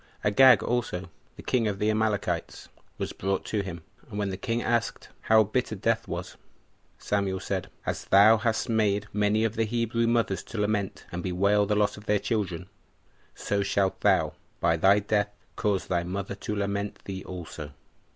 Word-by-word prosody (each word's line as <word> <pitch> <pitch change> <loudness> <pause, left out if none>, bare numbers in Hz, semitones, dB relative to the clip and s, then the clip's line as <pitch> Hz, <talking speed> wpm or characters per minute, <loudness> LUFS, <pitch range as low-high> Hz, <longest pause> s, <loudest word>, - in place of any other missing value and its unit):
Agag 125 +3 +6
also, 105 -8 -2 0.2
the - - -11
king 120 -3 +1
of 100 -2 -2
the 105 +2 +1
Amalekites, 110 -2 -1 0.3
was - - -4
brought 95 0 -2
to 105 - -1
him; 85 -4 -7 0.3
and 105 - -6
when 100 -2 -1
the - - -3
king 115 +5 -2
asked, 115 -1 -1 0.2
How 110 0 +7
bitter 110 +2 -1
death 115 +3 0
was? 85 +1 -6 0.6
Samuel 100 -2 -1
said, 95 -3 -3 0.2
"As - - -3
thou 105 +3 +7
hast 110 +1 0
made 105 -3 +1
many 105 +1 +2
of 115 -1 0
the 115 - +1
Hebrew 115 +1 0
mothers 115 -6 +1
to - - -8
lament 105 -2 -1
and 85 - -4
bewail 100 +3 +2
the 105 - +1
loss 105 -1 +1
of 105 +1 -13
their 105 - +3
children, 95 -6 -2 0.7
so 100 0 -1
shalt 100 -1 0
thou, - - +3 0.3
by 85 -1 +3
thy 95 +5 +5
death, 105 0 +1 0.3
cause 100 -4 0
thy 85 -2 0
mother 95 +3 -4
to 105 +1 -4
lament 100 0 -2
thee 95 -1 -5
also." 85 -5 -7
105 Hz, 175 wpm, -27 LUFS, 95-110 Hz, 0.7 s, How